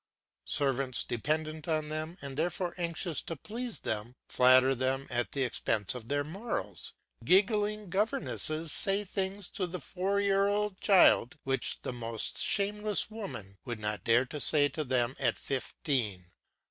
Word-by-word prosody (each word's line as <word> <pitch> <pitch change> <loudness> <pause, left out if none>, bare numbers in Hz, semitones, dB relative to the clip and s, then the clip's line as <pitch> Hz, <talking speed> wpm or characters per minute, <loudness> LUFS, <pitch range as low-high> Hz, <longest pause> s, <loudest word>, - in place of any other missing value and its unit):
Servants, 135 -3 +1
dependent 155 +5 -2
on 155 -2 0
them, 155 +3 -4
and 140 -1 -5
therefore 175 +3 -1
anxious 170 -2 -2
to 165 - -5
please 230 - -5
them, 110 +3 -3
flatter 130 +1 +6
them 130 +1 -1
at 120 -4 -1
the 140 - 0
expense 110 -4 0
of 120 -3 -8
their 145 +2 0
morals; 195 +11 -4 0.3
giggling 210 +2 +3
governesses 180 - -1
say 200 +1 +2
things 190 0 -2
to 195 -3 -2
the 180 +1 -5
four 195 +3 -1
year 200 0 +3
old 205 -1 -1
child 185 - +5
which 135 0 -1
the - - -3
most 115 -2 -3
shameless 210 +1 +1
woman 105 - -7
would 120 0 -5
not 105 0 -3
dare 120 +3 +4
to 150 +4 -6
say 145 -2 +4
to 155 +2 -4
them 130 -1 +1
at - - +1
fifteen. 115 - -2
155 Hz, 150 wpm, -31 LUFS, 130-195 Hz, 0.3 s, flatter